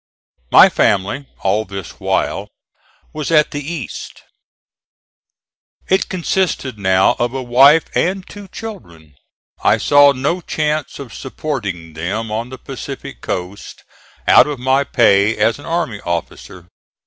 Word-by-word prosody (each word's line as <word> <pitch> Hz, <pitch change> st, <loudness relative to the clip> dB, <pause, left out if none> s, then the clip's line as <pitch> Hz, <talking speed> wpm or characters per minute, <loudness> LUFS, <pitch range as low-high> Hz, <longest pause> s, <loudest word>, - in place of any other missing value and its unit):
My -, -, +8 dB
family, 100 Hz, +8 st, 0 dB
all 100 Hz, +3 st, +1 dB
this 95 Hz, -3 st, -9 dB
while, -, -, -1 dB, 0.7 s
was 155 Hz, -2 st, -4 dB
at 155 Hz, -2 st, +3 dB
the 145 Hz, -, -4 dB
East. 150 Hz, -3 st, -7 dB, 1.7 s
It 190 Hz, +1 st, +2 dB
consisted 175 Hz, -, -1 dB
now 95 Hz, -1 st, +3 dB
of 120 Hz, +2 st, -1 dB
a 130 Hz, -, -3 dB
wife 135 Hz, +6 st, +5 dB
and 185 Hz, +1 st, -1 dB
two 205 Hz, -1 st, -11 dB
children. 85 Hz, -, -10 dB, 0.5 s
I -, -, +4 dB
saw 145 Hz, -1 st, +5 dB
no 140 Hz, +7 st, -1 dB
chance 155 Hz, -2 st, -2 dB
of 135 Hz, -5 st, -9 dB
supporting 100 Hz, -, -5 dB
them 100 Hz, +8 st, -4 dB
on 115 Hz, +3 st, -3 dB
the 130 Hz, -, -8 dB
Pacific 135 Hz, +1 st, -8 dB
coast 90 Hz, +3 st, -6 dB, 0.4 s
out -, -, +7 dB
of 145 Hz, -2 st, -4 dB
my 130 Hz, +3 st, +2 dB
pay 110 Hz, -5 st, +3 dB
as 110 Hz, +5 st, +1 dB
an -, -, -11 dB
army 165 Hz, -11 st, -2 dB
officer. 85 Hz, +1 st, -5 dB
130 Hz, 130 wpm, -17 LUFS, 100-150 Hz, 1.7 s, My